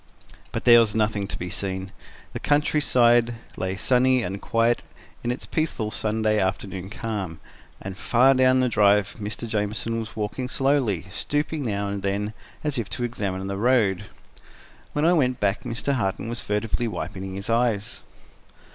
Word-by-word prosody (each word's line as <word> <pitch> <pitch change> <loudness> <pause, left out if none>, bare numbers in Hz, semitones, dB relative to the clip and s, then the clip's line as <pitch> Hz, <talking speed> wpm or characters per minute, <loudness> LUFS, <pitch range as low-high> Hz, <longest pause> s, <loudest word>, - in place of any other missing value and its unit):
But - - -4
there 120 -1 +9
was 110 -2 +2
nothing 105 -2 0
to - - -4
be 90 0 -5
seen. 95 -1 -3 0.4
The - - -4
countryside 120 -5 +3 0.2
lay 95 0 -2
sunny 130 +2 +3
and 95 +1 -4
quiet 115 0 +2 0.4
in 120 - -1
its 125 - -2
peaceful 140 -9 -2
Sunday 110 0 +1
afternoon 95 -1 -2
calm, 100 -6 -4 0.4
and 95 -1 -6
far 125 +6 +4
down 130 0 +4
the 130 - +3
drive 105 -3 +3
Mr. 105 +3 -5
Jamieson 110 +2 -1
was 110 -1 -7
walking 110 +4 -3
slowly, 130 - +1
stooping 150 - -2
now 100 -2 -1
and 100 0 -3
then, 100 +2 -1 0.3
as 145 -4 -1
if 110 - -4
to 120 - -3
examine 100 -6 -3
the 100 0 -3
road. 105 -4 +2 0.9
When 150 +1 +1
I 175 - +5
went 130 -7 +2
back, 100 0 +1
Mr. 125 +3 -2
Harton 115 -3 -1
was 120 0 -3
furtively 105 +3 -1
wiping 95 -3 -5
his 100 +1 -6
eyes. 115 -3 0
110 Hz, 160 wpm, -24 LUFS, 100-125 Hz, 0.9 s, there